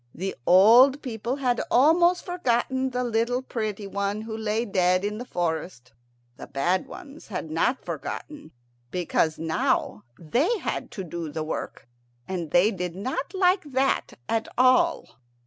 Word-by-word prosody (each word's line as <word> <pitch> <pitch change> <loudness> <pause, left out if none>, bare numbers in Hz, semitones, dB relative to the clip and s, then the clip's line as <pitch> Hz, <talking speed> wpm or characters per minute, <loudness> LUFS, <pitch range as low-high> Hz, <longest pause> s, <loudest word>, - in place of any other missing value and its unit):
The 190 +3 -4
old 240 +10 +7
people 235 -1 -3
had 250 -4 0
almost 345 +7 +4
forgotten 260 -6 0
the 250 0 -2
little 240 +2 0
pretty 215 -5 -4
one 200 +1 -2
who 220 0 -6
lay 220 +1 -1
dead 185 -1 +2
in 210 +1 -3
the 245 - -6
forest. 160 - -4 0.4
The - - -9
bad 175 +7 0
ones 315 -5 -11
had 170 -6 -5
not 240 +11 0
forgotten, 295 - -6 0.4
because 165 -1 0
now 160 -9 -1
they 270 - 0
had - - -4
to 195 - -5
do 170 -2 -6
the 155 +1 -3
work, 155 - -6 0.4
and 175 -4 -4
they 180 +8 +4
did 180 -3 -4
not 255 - -4
like 370 0 +3
that 265 +1 0
at 225 0 -1
all. 255 - +3
220 Hz, 145 wpm, -25 LUFS, 180-260 Hz, 0.4 s, old